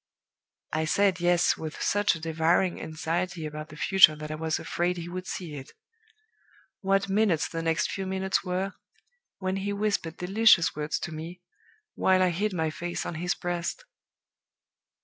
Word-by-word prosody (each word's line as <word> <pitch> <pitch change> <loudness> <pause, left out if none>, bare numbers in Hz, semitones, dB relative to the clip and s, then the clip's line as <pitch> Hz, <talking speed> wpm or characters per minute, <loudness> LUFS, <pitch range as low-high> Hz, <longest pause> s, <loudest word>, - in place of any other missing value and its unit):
I 160 0 +1
said 190 +2 +2
'Yes' 175 0 +3
with 155 -1 -6
such 205 -2 +2
a - - -7
devouring 165 +3 +1
anxiety 165 +2 -3
about 155 0 -6
the - - -11
future 185 -1 +6
that 150 0 -7
I - - -2
was 160 0 -1
afraid 175 +1 -1
he 170 0 -5
would 185 +1 -6
see 170 -5 -5
it. 135 -2 -9 1.1
What 195 0 +1
minutes 195 -6 +2
the 165 0 -4
next 165 0 0
few 195 -1 -4
minutes 190 -1 0
were, 185 +2 -2 0.6
when 190 0 -2
he 200 +1 -2
whispered 200 -5 -1
delicious 185 -3 +4
words 150 +1 -2
to 170 - -4
me, 165 +3 -8 0.5
while 185 0 +3
I 180 - +3
hid 205 +5 -1
my 160 -4 -1
face 175 +2 -4
on - - -4
his 180 0 0
breast! 175 - -3
175 Hz, 165 wpm, -27 LUFS, 160-190 Hz, 1.1 s, future